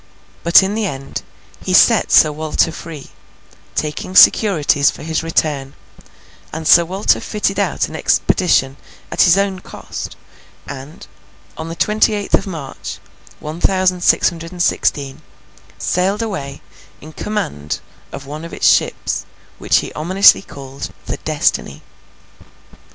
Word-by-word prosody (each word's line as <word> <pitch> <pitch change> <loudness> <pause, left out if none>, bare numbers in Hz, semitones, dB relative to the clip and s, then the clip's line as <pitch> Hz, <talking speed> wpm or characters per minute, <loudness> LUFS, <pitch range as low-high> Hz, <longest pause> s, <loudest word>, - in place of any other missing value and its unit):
But, 170 +3 +6
in 195 +2 -1
the 215 -1 -1
end, 135 -4 -6 0.4
he - - +1
set - - +4
Sir 155 - +6
Walter 155 +2 0
free, 160 -4 -10 0.6
taking 155 +4 -4
securities 155 -10 +5
for - - -8
his 160 +1 -2
return; 150 -4 -1 0.8
and 160 0 -5
Sir 170 - +7
Walter 190 +4 +1
fitted 205 -2 -2
out 200 - 0
an - - -9
expedition 135 -7 +1 0.3
at - - +1
his 180 0 +5
own 195 -1 0
coast - - -8 0.5
and, 135 +4 -10 0.5
on 160 +1 -7
the 165 - -6
twenty 215 +5 +2
eighth 205 -1 -5
of - - +2
March, 155 -8 -7 0.4
one 155 +2 -7
thousand 185 -1 +1
six - - +4
hundred 165 -1 -9
and 175 -1 -2
seventeen, 140 -6 -1 0.6
sailed 195 +5 0
away 145 -11 -6 0.4
in 155 +2 -12
command 75 - -4 0.3
of 135 - -8
one 150 +3 -8
of 170 - -9
its - - +1
ships, - - +1 0.3
which - - +2
he - - -8
ominously 185 +6 +4
called 135 -5 -9
the - - -4
Destiny. 70 - -1
165 Hz, 140 wpm, -17 LUFS, 145-190 Hz, 0.8 s, Sir